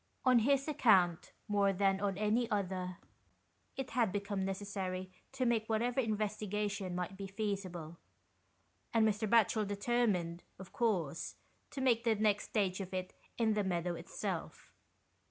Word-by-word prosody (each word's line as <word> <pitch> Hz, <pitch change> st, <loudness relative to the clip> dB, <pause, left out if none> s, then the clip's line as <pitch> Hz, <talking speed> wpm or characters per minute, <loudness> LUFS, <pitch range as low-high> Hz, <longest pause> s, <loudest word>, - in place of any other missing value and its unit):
On 255 Hz, -2 st, +6 dB
his 275 Hz, +4 st, +2 dB
account, 195 Hz, -, +3 dB, 0.2 s
more 200 Hz, -1 st, +3 dB
than 195 Hz, 0 st, +2 dB
on 200 Hz, -2 st, 0 dB
any 220 Hz, +3 st, +1 dB
other, 185 Hz, -3 st, -2 dB, 0.8 s
it 270 Hz, -1 st, -4 dB
had 230 Hz, -5 st, +2 dB
become 200 Hz, 0 st, -2 dB
necessary 190 Hz, -1 st, -3 dB, 0.2 s
to 265 Hz, -1 st, 0 dB
make 230 Hz, -2 st, +1 dB
whatever 235 Hz, +3 st, +1 dB
investigation 210 Hz, -4 st, -1 dB
might 180 Hz, +1 st, -3 dB
be 195 Hz, 0 st, -6 dB
feasible, 190 Hz, -5 st, -4 dB, 1.0 s
and 220 Hz, -1 st, +5 dB
Mr. 210 Hz, 0 st, 0 dB
Batchel 220 Hz, -1 st, +4 dB
determined, 200 Hz, -5 st, 0 dB, 0.2 s
of 190 Hz, -1 st, -11 dB
course, 180 Hz, -, -1 dB, 0.3 s
to 275 Hz, -, -5 dB
make 240 Hz, -3 st, +3 dB
the 230 Hz, -2 st, +3 dB
next 210 Hz, -1 st, +2 dB
stage 195 Hz, -3 st, 0 dB
of 190 Hz, 0 st, -5 dB
it 185 Hz, 0 st, -4 dB, 0.2 s
in 225 Hz, -2 st, +3 dB
the 210 Hz, -1 st, +1 dB
meadow 175 Hz, -2 st, -1 dB
itself. 170 Hz, -, -5 dB
205 Hz, 140 wpm, -34 LUFS, 185-225 Hz, 1.0 s, On